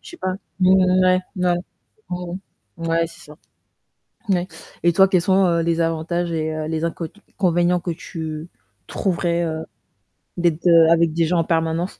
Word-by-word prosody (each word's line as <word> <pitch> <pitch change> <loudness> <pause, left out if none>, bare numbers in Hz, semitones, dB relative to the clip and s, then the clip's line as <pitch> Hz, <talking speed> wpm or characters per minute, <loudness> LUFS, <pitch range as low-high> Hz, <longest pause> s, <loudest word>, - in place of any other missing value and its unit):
je - - -12
sais 345 - -11
pas. 185 0 -2 0.3
Mmh 185 0 +5 0.3
ouais, 185 0 +4 0.2
ouais. 180 -1 +2 0.6
Mmh, 180 0 -4 0.5
ouais, 165 0 +2
c'est - - -15
ça. 150 - -13 1.0
N 190 - +4
ouais 175 +1 -3 0.4
et 175 - +5
toi, 190 +2 +6
quels 185 -2 +3
sont, 190 +1 +3
heu, 170 -1 +2
les 170 0 0
avantages 170 +1 -1
et 155 -1 -2
heu, 155 0 -4
les 160 +1 -2
incot 165 0 -3 0.3
inconvénients 175 -1 +2
que 175 - -4
tu 160 -1 -6 0.4
trouverais, 175 -2 -1
heu, 160 -1 -3 0.7
d'être 170 -2 0
de 165 -2 +6
avec 165 -1 +3
des 165 0 +2
gens 170 +2 +1
en - - +2
permanence? 165 +1 0
170 Hz, 175 wpm, -21 LUFS, 165-180 Hz, 1.0 s, toi